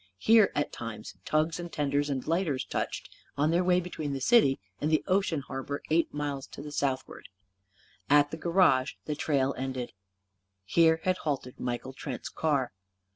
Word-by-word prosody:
Here, 220 - +5
at 145 - 0
times, 115 -2 -7
tugs 155 +3 +1
and 175 -1 -6
tenders 145 0 0
and 135 -3 -2
lighters 160 -6 0
touched; - - -3 0.3
on 150 +3 +2
their 175 +2 +3
way 180 0 +4
between 155 -5 -4
the 135 - -2
city 140 - +4 0.2
and 150 - 0
the 155 - +2
ocean 185 -5 +1
harbour, 135 +1 -5
eight 165 +1 +3
miles 145 -2 -3
to 150 +1 -7
southward. 135 -2 -3 0.8
At 145 0 +5
the 160 - -4
garage 165 -6 +3
the 150 - -2
trail 140 -2 +1
ended. 130 -2 -4 0.7
Here 160 +8 +4
had 185 0 +1
halted 135 -4 -3
Michael 125 +1 -3
Trent's 130 -1 -6
car. 140 -6 0
145 Hz, 160 wpm, -29 LUFS, 135-165 Hz, 0.8 s, Here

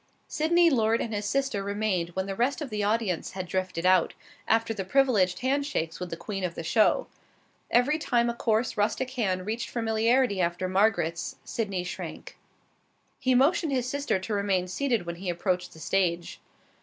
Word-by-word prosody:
Sydney 335 +2 +3
Lord 225 -3 +2
and 225 - -3
his 205 0 -2
sister 270 -3 0
remained 200 -4 -1
when 190 0 -1
the 195 - -3
rest 245 +7 0
of 290 -6 -6
the 210 -1 -1
audience 210 -4 -1
had 185 -1 -4
drifted 180 -1 -2
out, 185 -2 +4 0.3
after 225 0 +2
the 200 -3 -4
privileged 205 -5 +2
hand 275 +3 +1
shakes 165 - -3
with 180 -1 -5
the 165 - -5
queen 195 0 -5
of 175 -2 -2
the - - -5
show. 210 +7 +3 0.6
Every 280 +6 +3
time 240 -5 +1
a 235 - 0
coarse, 230 0 0
rustic 235 +5 0
hand 190 -8 -1
reached 225 +3 -3
familiarly 225 -1 +1
after 175 +1 0
Margaret's, 185 -4 +1
Sydney 200 -5 -3
shrank. 180 - -7 0.8
He 255 -1 +2
motioned 285 +3 +3
his 250 -2 0
sister 285 -4 0
to 190 +4 -5
remain 195 -3 0
seated 235 0 -1
when 170 0 -5
he 185 +1 -4
approached 180 +1 -1
the 160 - -14
stage. 175 -1 -1
210 Hz, 180 wpm, -27 LUFS, 185-245 Hz, 0.8 s, out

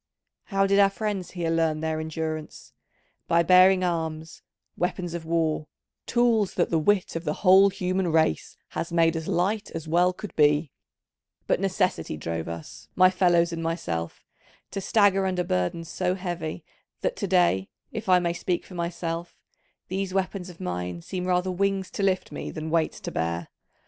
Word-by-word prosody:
How 195 -2 +1
did 200 +1 +3
our 200 -1 +6
friends 195 -2 -3
here 170 -3 -2
learn 160 -2 +1
their 160 0 -1
endurance? 155 0 -5 0.5
By 170 0 +4
bearing 185 +1 +6
arms, 160 -1 -3 0.3
weapons 175 -1 -2
of 170 -1 -5
war, 160 -2 0 0.4
tools 230 -4 +2
that 175 - +1
the 165 - +3
wit 190 +3 +1
of 165 - -3
the 150 +3 -4
whole 190 +2 +8
human 185 -1 -1
race 160 - +1
has 170 - -4
made 165 -1 +3
as 160 -1 -4
light 205 +5 0
as 165 -1 -5
well 175 +3 +3
could 200 +3 -9
be: 150 -1 +3 0.7
but - - +1
Necessity 185 - 0
drove 80 +1 -4
us, 85 -1 -8
my 185 0 +6
fellows 175 -2 +3
and 165 - -4
myself, 85 - -3 0.5
to 195 - -3
stagger 195 -2 +3
under 180 -1 0
burdens 125 - -1
so 180 +2 -1
heavy 175 -4 -5 0.4
that - - -1
to - - -2
day, 175 - +2 0.2
if 215 -3 -5
I 180 - +7
may 175 -1 0
speak 175 +1 -2
for - - -13
myself, 170 -1 -4 0.5
these 190 0 -3
weapons 190 -1 -2
of 175 - -13
mine 90 -1 -4
seem 180 -1 -4
rather 180 0 +1
wings 195 0 -1
to - - -4
lift 190 -1 +1
me - - -5
than 155 0 -5
weights 165 -1 +1
to - - -5
bear. 85 0 -2
175 Hz, 170 wpm, -26 LUFS, 160-185 Hz, 0.7 s, whole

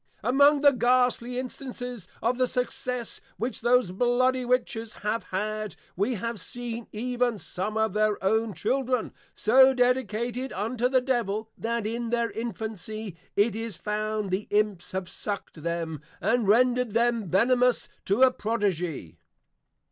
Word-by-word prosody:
Among 280 +5 +5
the 285 -1 +7
Ghastly 250 -1 +2
Instances 250 -4 -5 0.2
of 245 +2 +1
the 255 - +3
success 250 -1 -2 0.2
which 245 +3 -3
those 245 -6 +3
Bloody 250 +5 +2
Witches 235 -3 -1
have 220 +2 -1
had, 215 0 -3 0.2
we 205 +7 0
have 230 -1 -4
seen 235 +3 -4
even 245 +1 -1
some 205 +2 -3
of 220 0 +1
their 215 0 +2
own 220 +2 +1
Children, 255 -3 0 0.2
so 260 +4 +6
dedicated 245 0 0
unto 230 +5 -1
the 260 -1 +3
Devil, 225 -4 -1
that 230 -1 -2
in 230 +2 -2
their 235 0 0
Infancy, 220 -3 -5 0.2
it 205 +1 +3
is 225 -4 -4
found, 215 -1 -2
the 190 +3 -1
Imps 205 -3 0
have 190 -1 -2
sucked 200 -6 -5
them, 165 -2 -3 0.2
and 235 -2 +1
rendred 245 +1 +3
them 230 -4 +2
Venemous 245 +6 +3 0.2
to 205 +7 +3
a 260 - +7
Prodigy. 180 - -2
230 Hz, 140 wpm, -27 LUFS, 210-250 Hz, 0.2 s, the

